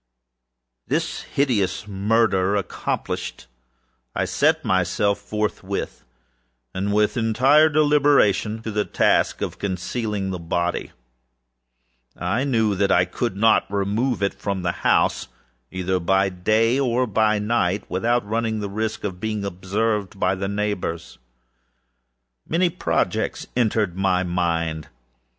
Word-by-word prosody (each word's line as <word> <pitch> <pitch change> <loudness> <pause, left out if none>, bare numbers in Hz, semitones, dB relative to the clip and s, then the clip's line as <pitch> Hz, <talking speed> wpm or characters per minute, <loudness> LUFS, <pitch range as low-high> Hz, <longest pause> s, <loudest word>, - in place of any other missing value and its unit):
This - - -1
hideous 110 -8 -1
murder 100 -1 +1
accomplished, 100 -4 -3 0.7
I - - 0
set - - +1
myself 95 +2 +1
forthwith, 100 -1 -4 0.7
and 100 +2 -2
with 105 +4 +2
entire 130 +7 +4
deliberation, 145 -8 +3
to 110 - -4
the 105 0 0
task - - +1
of - - -5
concealing 100 +1 -3
the 90 - -4
body. 85 +1 -2 1.3
I 105 +10 -1
knew 110 -6 +2
that 100 0 +1
I 90 - +4
could 110 +4 -3
not 110 -1 +3
remove 100 +4 0
it 100 - +1
from 100 -3 -4
the 90 - +1
house, - - +2 0.4
either 95 0 -1
by 95 +3 +2
day 110 +7 +2
or 125 -1 +1
by 110 -1 +2
night, 105 -3 0
without 115 +4 0
the 110 -2 -1
risk 110 +2 -3
of 95 -3 -4
being 110 0 -3
observed 100 +2 -2
by 95 0 +2
the 95 +1 -3
neighbors. 100 -5 -3 1.3
Many 175 +2 +2
projects - - -1
entered 110 -6 +1
my 95 -1 +1
mind. 85 -3 -1
105 Hz, 120 wpm, -22 LUFS, 95-115 Hz, 1.3 s, entire